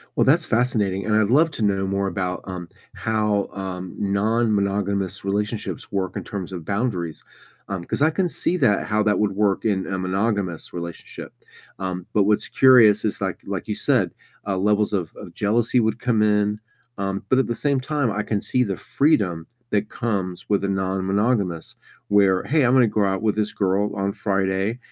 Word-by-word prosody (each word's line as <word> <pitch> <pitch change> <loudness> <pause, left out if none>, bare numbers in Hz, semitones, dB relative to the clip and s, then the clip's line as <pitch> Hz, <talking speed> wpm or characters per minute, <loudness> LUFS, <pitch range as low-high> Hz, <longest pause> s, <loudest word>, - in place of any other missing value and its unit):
Well, - - +3
that's 155 +5 +4
fascinating, 110 -5 0
and 105 - +2
I'd 110 +1 +2
love 160 +4 +5
to 115 - -4
know 95 -1 +1
more 100 0 0
about, 90 0 -2
um, 90 -3 -7 0.2
how, 105 -2 0
um, 95 -2 -6
non-monogamous 100 -2 0
relationships 105 +2 -3
work 95 -2 -2
in - - -4
terms 95 -2 -6
of 85 -3 -6
boundaries, 100 -7 -2 0.4
um, 95 -3 -4
'cause 140 - -1
I 160 - +4
can 180 +1 0
see 175 - 0
that 105 - +2
how 105 0 +1
that 105 -1 +2
would 105 -2 +1
work 100 0 0
in 95 -3 0
a 95 -1 -2
monogamous 95 -1 -2
relationship, 85 -1 -8 0.5
um, 90 -1 -4
but 105 - +4
what's 105 0 +1
curious 115 -6 +6
is, 105 - -2
like - - -2
like - - -5
you - - -1
said, - - +1 0.3
uh, 100 - -1
levels 105 +2 +1
of 90 -5 -1
of - - -10
jealousy 115 +4 +1
would 110 0 +1
come 115 -3 +1
in, 105 0 +2 0.4
um 100 0 -3
but 130 - +4
at 135 - +1
the 120 - -2
same 140 0 +1
time, 140 -3 -1
I 105 +1 -1
can 105 0 -1
see 125 +4 0
the 95 -5 -3
freedom 95 - +1 0.2
that 105 0 0
comes 95 -6 -3
with 100 -1 +1
a - - +1
non-monogamous 95 0 -1 0.3
where, 100 -2 +4
"Hey, 155 +2 +2
Imma 125 0 +5
go 105 0 +1
out 95 +2 0
with 105 -1 +1
this 105 -1 -1
girl 100 +1 0
on 100 0 -1
Friday, 95 +1 -1
100 Hz, 185 wpm, -23 LUFS, 95-110 Hz, 0.5 s, curious